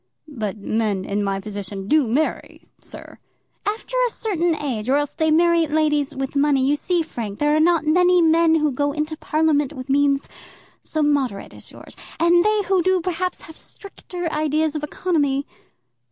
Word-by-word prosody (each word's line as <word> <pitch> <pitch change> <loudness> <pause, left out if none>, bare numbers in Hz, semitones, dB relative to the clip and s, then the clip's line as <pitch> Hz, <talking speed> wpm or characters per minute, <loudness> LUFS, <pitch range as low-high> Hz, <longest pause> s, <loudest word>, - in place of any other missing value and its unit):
"But 220 -8 -5
men 210 -2 -1
in 205 +1 -2
my 195 -1 -1
position 200 -1 -7
do 300 -1 +3
marry, 285 +8 -2 0.2
sir." - - -11 0.5
"After 440 +4 -3
a - - +2
certain 350 -8 -1
age, 255 -7 -4
or 275 - +4
else 290 -1 -2
they 315 0 0
marry 335 +1 +3
ladies 295 -1 0
with 270 +1 -4
money. 280 -2 +2
You 285 +2 +2
see, 345 +3 -1
Frank, 220 -9 -6
there 295 0 +2
are - - +3
not 330 -1 +3
many 360 +3 +4
men 325 0 +4
who 305 -2 +1
go 285 +2 -1
into 305 +1 -3
Parliament 305 -2 0
with 260 -1 -9
means 280 0 +2 0.5
so 310 -1 -2
moderate 275 -8 -1
as - - -11
yours; - - -13 0.2
and 345 +1 +4
they 425 0 +2
who 375 0 +1
do 375 +1 +2
perhaps 360 +1 -3
have 320 - -13
stricter 365 -3 -9
ideas 310 0 0
of 300 - -4
economy." 290 -4 -1
300 Hz, 175 wpm, -21 LUFS, 270-335 Hz, 0.5 s, or